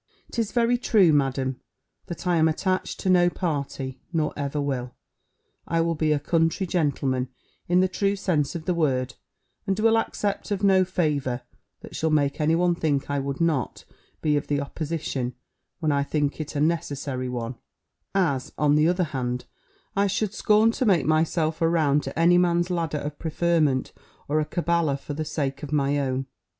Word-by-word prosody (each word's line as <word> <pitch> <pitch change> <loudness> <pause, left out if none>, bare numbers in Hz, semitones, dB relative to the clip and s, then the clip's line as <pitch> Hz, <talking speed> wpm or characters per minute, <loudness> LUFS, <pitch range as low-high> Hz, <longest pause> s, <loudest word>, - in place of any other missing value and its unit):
"'Tis 225 -3 -1
very 240 0 +2
true. 200 -9 +4
Madam, 135 -2 0 0.5
that 175 0 -7
I 175 -1 +2
am 160 0 +4
attached 185 +4 -1
to - - -3
no 175 -1 +5
party, 140 -6 -3
nor 160 -3 0
ever 145 +1 -2
will. 130 -4 -3 0.7
I 165 0 +1
will 165 0 +1
be 155 -1 0
a 150 - +3
country 165 +5 +1
gentleman, 140 -7 0 0.4
in 180 +1 +4
the 185 - +3
true 200 +2 0
sense 175 -7 0
of 165 -1 -5
the 180 - +1
word, 130 -6 0 0.5
and 195 +1 0
will 225 +1 +4
accept 205 -2 -2
of 205 -1 -2
no 190 -1 +5
favour 150 -9 -1 0.4
that - - -10
shall 160 - 0
make 145 -1 +1
any 155 +2 +3
one 175 +1 +3
think 145 -4 -1
I 140 - 0
would 135 0 -3
not 160 -7 -1 0.4
be 150 -1 +3
of 145 - -1
the 145 -1 0
opposition 140 -4 -3 0.4
when 155 -3 0
I 140 0 +2
think 145 +1 -1
it 150 - -7
a - - 0
necessary 145 -5 -1
one; 120 -1 -3 0.6
as, 145 -10 +1
on 150 -1 +3
the 150 +1 +4
other 180 +1 +2
hand, 125 -5 -3 0.5
I 200 +1 +3
should 205 +1 -1
scorn 215 +2 +4
to 255 - -2
make 175 -8 +3
myself 155 0 +1
a 165 - +4
round 150 -4 +2
to - - -6
any 175 +1 +5
man's 175 0 +2
ladder 165 -4 -1
of 145 0 -5
preferment, 160 -4 +1 0.3
or 150 +2 +1
a 155 - 0
caballer 170 -4 0
for 145 - -6
the 155 +2 -3
sake 145 -3 -3
of 150 -2 -7
my 145 -1 +1
own." 135 -1 -1
155 Hz, 185 wpm, -25 LUFS, 140-175 Hz, 0.7 s, no